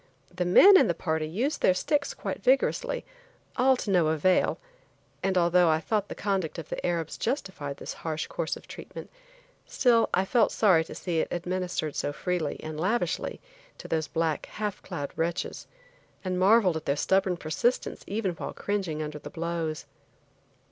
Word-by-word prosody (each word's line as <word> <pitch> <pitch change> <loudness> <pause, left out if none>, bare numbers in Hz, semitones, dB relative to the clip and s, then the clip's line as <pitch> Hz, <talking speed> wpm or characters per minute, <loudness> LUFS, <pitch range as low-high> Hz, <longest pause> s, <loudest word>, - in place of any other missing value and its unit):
The 180 0 -1
men 380 - +8
in - - +4
the 170 - 0
party 160 -2 -1
used 240 - -2
their 185 - +4
sticks 285 +8 0
quite - - -5
vigorously; 270 - +1 0.5
all 260 +1 +4
to 210 - -3
no 175 -4 +4
avail, 160 +4 +2 0.6
and 190 0 0
although 175 0 +4
I 155 0 +3
thought 205 +4 -1
the - - -5
conduct 190 -6 -1
of 165 -2 -7
the - - -4
Arabs 170 -3 -2
justified 190 - -3
this - - -6
harsh 160 -1 -2
course - - -3
of - - -16
treatment, - - -9 0.6
still 235 -3 +3
I 190 - +2
felt 235 +4 +3
sorry 185 -7 +4
to - - -9
see 170 -3 -2
it - - 0
administered 180 -3 -2
so - - -1
freely 175 -2 -2
and 155 -1 -5
lavishly 215 +8 -1 0.4
to - - -9
those 160 -1 -1
black, 160 +1 -1
half 210 -2 -4
clad 145 -1 -5
wretches, 170 +2 -3 0.6
and 185 -1 -1
marveled 190 -3 +5
at 160 - -8
their 140 - +1
stubborn 190 +3 +1
persistence 170 +10 -1
even 205 -1 -1
while 170 - -6
cringing 185 -7 -2
under 150 0 -6
the - - -9
blows. 165 -2 -3
180 Hz, 170 wpm, -27 LUFS, 160-200 Hz, 0.6 s, men